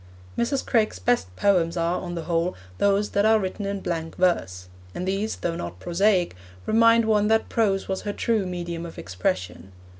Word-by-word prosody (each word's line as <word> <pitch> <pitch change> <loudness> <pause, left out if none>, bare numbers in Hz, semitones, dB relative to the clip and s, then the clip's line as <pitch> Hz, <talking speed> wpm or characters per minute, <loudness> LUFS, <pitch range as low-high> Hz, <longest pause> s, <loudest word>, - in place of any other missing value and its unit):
Mrs. 265 +3 0
Craik's 220 - +1
best 90 -1 0
poems 175 - +2
are, 170 +1 0
on 175 -1 -5
the 165 - -4
whole, 170 +2 0 0.2
those 200 +1 +2
that 200 - +2
are 220 +1 +5
written 195 +1 -3
in 200 -1 -3
blank 165 -2 -3
verse; 90 - 0 0.3
and 180 - -3
these, 200 +3 -1
though 170 -1 -3
not 85 - -6
prosaic, 180 - +1 0.3
remind 230 +1 +5
one 210 -1 +3
that 220 +1 +2
prose 200 -4 +1
was 190 -1 -2
her 205 - -3
true 220 -4 0
medium 170 -2 -4
of 170 - -9
expression. 95 0 -3
185 Hz, 180 wpm, -24 LUFS, 165-210 Hz, 0.3 s, are